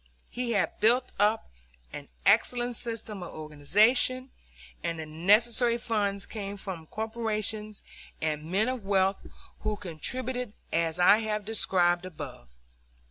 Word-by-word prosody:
He 245 Hz, -1 st, -2 dB
had 200 Hz, -, 0 dB
built 235 Hz, +4 st, +4 dB
up 210 Hz, +2 st, +2 dB, 0.4 s
an -, -, -7 dB, 0.2 s
excellent 245 Hz, 0 st, +3 dB
system 225 Hz, -4 st, -5 dB
of 175 Hz, -, -8 dB
organization, 210 Hz, -, +2 dB, 0.5 s
and 165 Hz, -, -2 dB
the 160 Hz, -, -5 dB
necessary 220 Hz, +9 st, +3 dB
funds 205 Hz, -4 st, -1 dB
came 205 Hz, -2 st, -6 dB
from 180 Hz, -5 st, -7 dB
corporations 215 Hz, -1 st, -3 dB, 0.4 s
and 150 Hz, -1 st, -1 dB
men 205 Hz, +5 st, +2 dB
of 255 Hz, -4 st, -2 dB
wealth 195 Hz, 0 st, +2 dB, 0.4 s
who 215 Hz, -, -1 dB
contributed 245 Hz, -, -4 dB, 0.2 s
as 165 Hz, 0 st, +1 dB
I 180 Hz, +4 st, +6 dB
have 215 Hz, -2 st, -2 dB
described 185 Hz, -4 st, +2 dB
above. 145 Hz, -, -9 dB
210 Hz, 125 wpm, -28 LUFS, 175-230 Hz, 0.5 s, I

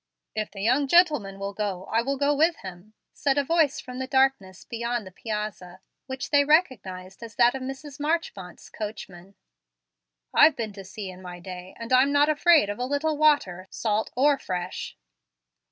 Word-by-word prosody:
"If 215 Hz, -1 st, -2 dB
the 195 Hz, -1 st, -7 dB
young 260 Hz, +6 st, +2 dB
gentleman 295 Hz, -, +3 dB
will 200 Hz, 0 st, -5 dB
go, 195 Hz, -3 st, -3 dB
I 225 Hz, -, +3 dB
will 275 Hz, +3 st, -2 dB
go 285 Hz, +1 st, +2 dB
with 320 Hz, +4 st, +3 dB
him," 190 Hz, +3 st, -10 dB, 0.2 s
said 280 Hz, -1 st, 0 dB
a 285 Hz, -, +3 dB
voice 310 Hz, -1 st, +2 dB
from 250 Hz, 0 st, -8 dB
the 260 Hz, -, -3 dB
darkness 265 Hz, -9 st, +1 dB
beyond 235 Hz, -1 st, -3 dB
the 185 Hz, -, -10 dB
piazza, 210 Hz, -3 st, -5 dB, 0.3 s
which 260 Hz, -1 st, -6 dB
they 285 Hz, -1 st, +5 dB
recognized 200 Hz, -, 0 dB
as 230 Hz, -1 st, -9 dB
that 240 Hz, 0 st, +4 dB
of 265 Hz, -, -5 dB
Mrs. 270 Hz, +2 st, -7 dB
Marchmont's 290 Hz, -, -3 dB
coachman. 195 Hz, -3 st, -8 dB, 1.0 s
"I've 315 Hz, -, +6 dB
been 220 Hz, -3 st, -4 dB
to 195 Hz, -1 st, -9 dB
sea 190 Hz, 0 st, -7 dB
in 185 Hz, 0 st, -13 dB
my 180 Hz, -1 st, -9 dB
day, 180 Hz, +1 st, -9 dB
and 230 Hz, +2 st, -4 dB
am 260 Hz, +2 st, +5 dB
not 290 Hz, +1 st, +4 dB
afraid 310 Hz, -, +5 dB
of 205 Hz, +2 st, -5 dB
a 250 Hz, -, -1 dB
little 290 Hz, +3 st, 0 dB
water, 285 Hz, -13 st, +2 dB
salt 215 Hz, -1 st, -1 dB
or 275 Hz, +2 st, +3 dB
fresh." 180 Hz, 0 st, -5 dB
235 Hz, 180 wpm, -26 LUFS, 195-285 Hz, 1.0 s, I've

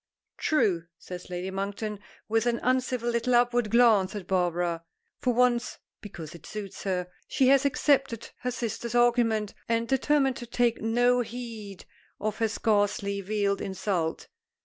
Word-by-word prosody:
"True," 200 Hz, -, +1 dB
says 180 Hz, +1 st, -9 dB
Lady 180 Hz, +1 st, -4 dB
Monkton, 200 Hz, +2 st, -3 dB, 0.3 s
with 225 Hz, +2 st, +1 dB
an 235 Hz, -1 st, +1 dB
uncivil 250 Hz, -1 st, +1 dB
little 235 Hz, +1 st, +1 dB
upward 240 Hz, -2 st, +3 dB
glance 220 Hz, -5 st, +4 dB
at 200 Hz, -3 st, -5 dB
Barbara. 175 Hz, -2 st, 0 dB, 0.4 s
For 250 Hz, -, +1 dB
once 245 Hz, 0 st, +2 dB, 0.2 s
because 170 Hz, -6 st, -8 dB
it 170 Hz, -3 st, -12 dB
suits 205 Hz, -3 st, -7 dB
her 180 Hz, -2 st, -1 dB, 0.2 s
she 260 Hz, -1 st, +3 dB
has 275 Hz, +1 st, +5 dB
accepted 275 Hz, -4 st, +1 dB
her 250 Hz, -, -2 dB
sister's 235 Hz, -1 st, -4 dB
argument, 235 Hz, -3 st, +3 dB, 0.2 s
and 230 Hz, 0 st, +1 dB
determined 270 Hz, 0 st, +2 dB
to 240 Hz, -, -7 dB
take 235 Hz, 0 st, +1 dB
no 245 Hz, +2 st, +3 dB
heed 225 Hz, -4 st, -7 dB, 0.3 s
of 215 Hz, +1 st, -2 dB
her 225 Hz, -, +3 dB
scarcely 205 Hz, -2 st, 0 dB
veiled 200 Hz, 0 st, 0 dB
insult. 185 Hz, -4 st, -2 dB
225 Hz, 145 wpm, -28 LUFS, 195-245 Hz, 0.4 s, has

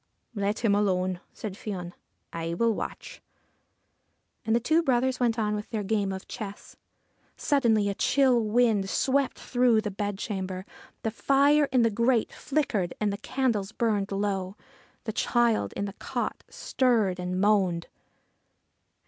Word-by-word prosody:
' -, -, -49 dB
Let 205 Hz, +2 st, -1 dB
him 205 Hz, -, +4 dB
alone/ 185 Hz, -3 st, +1 dB
said 210 Hz, -3 st, -6 dB
Fion. 185 Hz, -4 st, -6 dB, 0.2 s
' -, -, -48 dB
I 165 Hz, +1 st, -2 dB
will 230 Hz, +4 st, +2 dB
watch.' -, -, -6 dB, 1.2 s
And 220 Hz, +1 st, +1 dB
the -, -, +4 dB
two 315 Hz, +7 st, +2 dB
brothers 260 Hz, -3 st, +1 dB
went 240 Hz, -2 st, +1 dB
on 210 Hz, -2 st, 0 dB
with 210 Hz, 0 st, -4 dB
their 215 Hz, -2 st, -2 dB
game 200 Hz, -1 st, 0 dB
of 190 Hz, 0 st, -6 dB
chess. 205 Hz, -4 st, -8 dB, 0.6 s
Suddenly 230 Hz, -8 st, +2 dB
a 200 Hz, -, 0 dB
chill 255 Hz, +1 st, +3 dB
wind 215 Hz, -3 st, +2 dB
swept 270 Hz, +3 st, +1 dB
through 245 Hz, -3 st, +2 dB
the 210 Hz, -2 st, -4 dB
bedchamber. 190 Hz, -2 st, -4 dB, 0.4 s
The 225 Hz, -, -1 dB
fire 280 Hz, +5 st, +3 dB
in 255 Hz, -2 st, +4 dB
the 230 Hz, -, +3 dB
grate 235 Hz, +2 st, +1 dB
flickered, 235 Hz, -, -1 dB
and 210 Hz, -2 st, 0 dB
the -, -, -4 dB
candles 220 Hz, -4 st, -1 dB
burned 210 Hz, -4 st, 0 dB
low: 195 Hz, -1 st, -2 dB, 0.5 s
the 220 Hz, -, -4 dB
child 230 Hz, -, +1 dB
in 200 Hz, -, -3 dB
the 200 Hz, -, -6 dB
cot -, -, -4 dB
stirred 220 Hz, -8 st, +1 dB
and 180 Hz, +1 st, -2 dB
moaned. 190 Hz, -4 st, +2 dB
215 Hz, 150 wpm, -27 LUFS, 195-240 Hz, 1.2 s, him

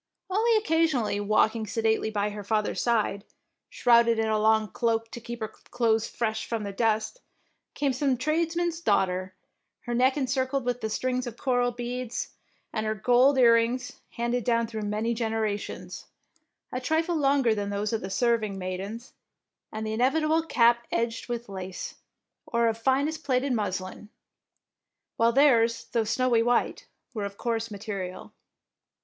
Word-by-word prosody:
Only 445 Hz, +3 st, +3 dB
occasionally, 320 Hz, -, +1 dB
walking 215 Hz, +2 st, +2 dB
sedately 220 Hz, 0 st, 0 dB
by 210 Hz, -1 st, -1 dB
her 205 Hz, 0 st, -7 dB
father's 210 Hz, +1 st, 0 dB
side, 215 Hz, -4 st, 0 dB, 0.5 s
shrouded 235 Hz, -1 st, +4 dB
in 220 Hz, 0 st, 0 dB
a 215 Hz, 0 st, +1 dB
long 220 Hz, -1 st, +3 dB
cloak 225 Hz, -1 st, -1 dB
to 235 Hz, -, -8 dB
keep 235 Hz, 0 st, -7 dB
her 220 Hz, -, -1 dB
clothes 225 Hz, -1 st, -1 dB
fresh 220 Hz, -2 st, -2 dB
from 230 Hz, -2 st, -2 dB
the 200 Hz, -, -4 dB
dust, 220 Hz, -, 0 dB, 0.5 s
came 280 Hz, -2 st, 0 dB
some 260 Hz, 0 st, +1 dB
tradesman's 330 Hz, +4 st, 0 dB
daughter, 185 Hz, -, 0 dB, 0.5 s
her 240 Hz, -, -4 dB
neck 255 Hz, +3 st, +3 dB
encircled 260 Hz, 0 st, -1 dB
with 245 Hz, -3 st, -2 dB
strings 255 Hz, +2 st, -1 dB
of 235 Hz, -1 st, -7 dB
coral 245 Hz, -2 st, +1 dB
beads, 245 Hz, 0 st, -4 dB, 0.4 s
and 215 Hz, -1 st, -2 dB
her 215 Hz, -, 0 dB
gold 250 Hz, +6 st, +4 dB
earrings, 240 Hz, +1 st, +3 dB
handed 240 Hz, 0 st, -1 dB
down 230 Hz, 0 st, +2 dB
through 220 Hz, -1 st, -5 dB
many 215 Hz, +3 st, -1 dB
generations, 220 Hz, -3 st, -3 dB, 0.6 s
a 255 Hz, -, -3 dB
trifie 320 Hz, +6 st, 0 dB
longer 275 Hz, -5 st, +3 dB
than 205 Hz, -1 st, -3 dB
those 205 Hz, +2 st, -2 dB
of 225 Hz, -, -1 dB
the 190 Hz, -, -5 dB
serving 215 Hz, -1 st, +1 dB
maidens, 195 Hz, +6 st, -6 dB, 0.6 s
and 215 Hz, 0 st, -4 dB
the 215 Hz, 0 st, -2 dB
inevi 260 Hz, +7 st, +2 dB
table 315 Hz, +1 st, +2 dB
cap 235 Hz, -6 st, +3 dB
edged 230 Hz, +1 st, -2 dB
with 240 Hz, 0 st, -4 dB
lace, 190 Hz, -2 st, -6 dB, 0.5 s
or 235 Hz, -1 st, +2 dB
of 225 Hz, -, +1 dB
finest 275 Hz, +7 st, 0 dB
plaited 260 Hz, 0 st, +1 dB
muslin, 190 Hz, -1 st, -3 dB, 1.1 s
while 230 Hz, +1 st, +4 dB
theirs, 235 Hz, -4 st, +3 dB
though 230 Hz, -2 st, +1 dB
snowy 235 Hz, +1 st, +2 dB
white, 240 Hz, +1 st, 0 dB, 0.3 s
were 215 Hz, -4 st, -3 dB
of 200 Hz, 0 st, -5 dB
coarse 230 Hz, -1 st, -2 dB
material. 200 Hz, -3 st, -6 dB
230 Hz, 150 wpm, -27 LUFS, 215-255 Hz, 1.1 s, shrouded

